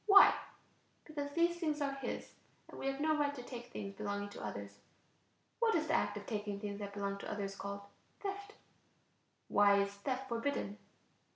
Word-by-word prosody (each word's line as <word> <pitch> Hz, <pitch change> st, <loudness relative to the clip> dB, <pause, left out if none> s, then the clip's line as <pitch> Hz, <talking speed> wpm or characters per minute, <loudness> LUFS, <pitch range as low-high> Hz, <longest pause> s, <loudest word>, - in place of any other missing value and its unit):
Why? 395 Hz, -1 st, +10 dB, 0.7 s
Because 290 Hz, -2 st, -3 dB
these 340 Hz, +1 st, +3 dB
things 310 Hz, -3 st, 0 dB
are 280 Hz, -1 st, +1 dB
his 270 Hz, -3 st, -4 dB, 0.4 s
and -, -, -10 dB
we -, -, -2 dB
have 270 Hz, 0 st, 0 dB
no 310 Hz, +1 st, +3 dB
right 290 Hz, -1 st, +2 dB
to 250 Hz, -, -6 dB
take 245 Hz, -1 st, -7 dB
things 200 Hz, -1 st, -4 dB
belonging 205 Hz, 0 st, -2 dB
to -, -, -8 dB
others. 100 Hz, -1 st, -5 dB, 0.8 s
What 460 Hz, -1 st, +4 dB
is -, -, +3 dB
the -, -, 0 dB
act -, -, +2 dB
of -, -, -6 dB
taking 205 Hz, -2 st, -2 dB
things 200 Hz, 0 st, -4 dB
that 200 Hz, -1 st, -5 dB
belong 200 Hz, -1 st, -1 dB
to -, -, -5 dB
others 200 Hz, -1 st, -2 dB
called? 200 Hz, 0 st, -4 dB, 0.4 s
Theft. 400 Hz, +1 st, -4 dB, 0.9 s
Why 200 Hz, 0 st, +6 dB
is 200 Hz, 0 st, +1 dB
theft 255 Hz, +6 st, -2 dB
forbidden? 230 Hz, -4 st, -1 dB
230 Hz, 180 wpm, -36 LUFS, 200-290 Hz, 0.9 s, Why